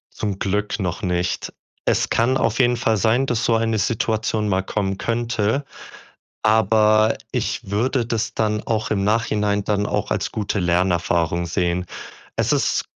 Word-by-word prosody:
Zum 100 -2 -3
Glück 105 +2 -1
noch 90 0 -2
nicht. 90 -1 -1 0.3
Es - - +1
kann 130 +3 +2
auf 115 +3 0
jeden 120 -1 +3
Fall 110 -1 +1
sein, 115 +6 +2
dass 120 -3 -1
so 115 - +3
eine 115 0 +1
Situation 110 0 0
mal 95 0 +2
kommen 95 0 -2
könnte. 115 +3 -1 0.8
Aber 110 0 +4 0.2
ich 120 -3 -2
würde 120 +4 +1
das 115 -1 -2
dann 105 -1 0
auch 110 -1 -1
im 100 -2 0
Nachhinein 105 -1 +1
dann 105 0 0
auch - - -2
als - - -1
gute 105 -1 -2
Lernerfahrung 85 -1 +1
sehen. 90 +1 -1 0.5
Es - - +1
ist - - +1
105 Hz, 150 wpm, -21 LUFS, 95-115 Hz, 0.8 s, Aber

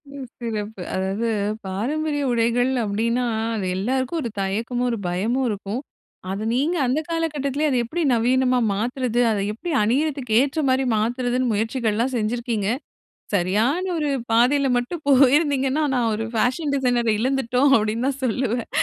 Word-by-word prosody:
ம். 270 -2 -6
சிறப்பு 215 -4 -4
அதாவது 195 +5 -1 0.4
பாரம்பரிய 290 +10 -2
உடைகள் 240 +2 +2
அப்டின்னா, 230 +4 0 0.3
அது 190 -3 -2
எல்லாருக்கும் 260 - -1
ஒரு 235 - -2
தயக்கமும், 230 +6 -1
ஒரு 230 - -2
பயமும் 225 +9 0
இருக்கும். 210 +4 -4 0.5
அத 200 +3 -3
நீங்க 310 +8 +1
அந்த 255 +5 +1
காலகட்டத்திலேயே 305 -3 -1
அத 255 - +1
எப்டி 330 +9 -3
நவீனமா 250 +2 +2
மாத்துறது 240 +3 -1
அத 205 - 0
எப்டி 315 +12 -6
அணிறத்துக்கு 265 +1 0
ஏற்ற 285 +3 -1
மாரி 260 +1 +2
மாத்துறதுன்னு 245 +2 0
முயற்சிகள்லாம் 225 +2 0
செஞ்சிருக்கீங்க. 225 -2 -1 0.7
சரியான 215 - +1
ஒரு 300 -2 0 0.2
பாதையில 265 +4 +3
மட்டும் 295 +7 -3
போயிருந்தீங்கன்னா, 275 +1 +4
நான் 240 -3 +1
ஒரு 225 +1 -3
ஃபேஷன் 260 +7 0
டிசைனர 245 -3 +1
இழந்துட்டோம் 265 +2 +2
அப்டின்னு 220 +4 -1
தான் 275 0 -3
சொல்லுவேன். 240 0 -1
245 Hz, 135 wpm, -22 LUFS, 225-270 Hz, 0.7 s, போயிருந்தீங்கன்னா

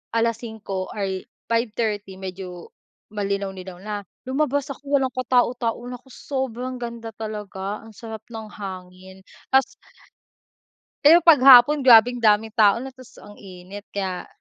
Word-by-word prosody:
5:00, 220 -4 -2
ay, 190 -2 -3 0.2
5:30 220 -4 -2
medyo 185 -2 -8 0.4
malinaw-linaw 195 -2 -4
na. 210 0 -5 0.3
Lumabas 285 0 0
ako 280 0 0
walang 260 -1 -2
katao-tao, 245 -2 +1
naku, 250 +1 -10
sobrang 255 -2 -4
ganda 230 -1 -6
talaga, 210 -2 -6
ang 220 - -14
sarap 220 -1 -9
ng 220 -1 -8
hangin, 190 -1 -10 0.3
tas 265 0 +6 1.4
Pero 330 +3 +8
'pag 330 -5 +7
hapon, 270 +3 +9
grabeng 245 +1 +7
daming 220 -1 +3
tao 215 +2 +4
na 265 - -7
ta's 255 -1 -16
ang 205 0 -14
init 190 +1 -11
kaya 190 -3 -3
220 Hz, 125 wpm, -23 LUFS, 195-250 Hz, 1.4 s, hapon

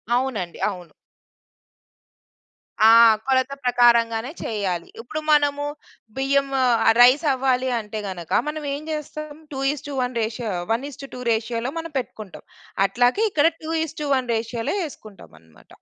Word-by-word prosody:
అవునండి, 240 -9 -2
అవును. 180 -4 -9 1.9
ఆ! 220 +1 +8 0.4
కొలత 260 0 +2
ప్రకారంగానే 235 0 +3
చెయ్యాలి. 190 -6 -2
ఇప్పుడు 280 +6 -5
మనము 290 -1 +3 0.5
బియ్యం 275 +1 +1 0.2
ఆహ్, 235 -3 +3 0.2
రైస్ 260 +6 +6
అవ్వాలి 260 -1 0
అంటే 215 0 -6
గనక 175 -3 -8 0.2
మనం 300 0 -4
ఏం 285 - -4
చేస్తాం? 305 0 -6 0.2
2:1 270 -2 -2
రేషియో, 220 0 -3 0.2
1:2 275 +1 -4
రేషియోలో 230 +3 -2
మనం 330 -1 -7
పెట్టుకుంటాం. 215 -6 -9 0.4
అట్లాగే 245 - +2
ఇక్కడ 300 0 +4 0.2
2:1 300 -5 -1
రేషియోలో 230 - -3
ఎసుకుంటాం 215 -7 -14
అన్నమాట. 80 -1 -23
250 Hz, 110 wpm, -23 LUFS, 225-285 Hz, 1.9 s, ఆ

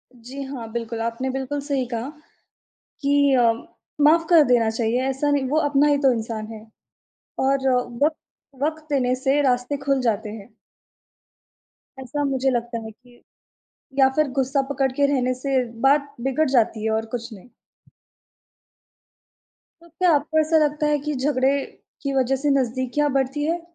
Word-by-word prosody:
जी 250 +4 -9
हाँ, 250 -5 -7
बिल्कुल। 230 0 -4
आपने 230 +3 -2
बिल्कुल 270 +2 -3
सही 280 -2 -1
कहा, 235 +4 -3 0.9
कि 285 -1 +3
अ, 230 -1 +5 0.5
माफ 325 +2 +5
कर 335 -3 +8
देना 240 -4 +3
चाहिए। 230 +2 0
ऐसा 270 +2 0
नहीं 285 -2 +1
वो 300 +4 +1
अपना 285 +1 +3
ही 290 - +3
तो 270 -2 +4
इंसान 220 -1 -4
है 220 0 -11 0.8
और 270 0 +1 0.4
वक़्त 310 +1 +1 0.5
वक़्त 310 0 -2
देने 255 -3 +1
से 270 +3 +1
रास्ते 250 +1 0
खुल 275 -1 +1
जाते 220 -3 0
हैं। 215 +1 -11 1.5
ऐसा 270 +3 -3
मुझे 270 -1 0
लगता 240 -2 -2
है 220 - -7
कि 245 +2 -22 0.8
या 265 0 +6
फिर 305 -1 +2
गुस्सा 270 +1 +1
पकड़ 270 -1 0
के 280 +2 +1
रहने 255 -2 +1
से 260 0 0 0.2
बात 285 0 +2
बिगड़ 270 +3 +1
जाती 230 -4 +1
है, 220 - 0
और 220 0 -1
कुछ 235 0 -6
नहीं। 210 +4 -14 2.3
तो 340 - -17
क्या 350 +2 +1
आपको 305 +2 0
ऐसा 315 +1 +3
लगता 300 0 0
है 295 - +2
कि 300 - -1
झगड़े 265 0 +1 0.5
की 280 -1 -2
वज़ह 265 0 +2
से 295 - +1
नज़दीकियाँ 260 +4 -1
बढ़ती 275 +2 0
है? 335 +2 0
265 Hz, 160 wpm, -23 LUFS, 240-290 Hz, 2.3 s, कर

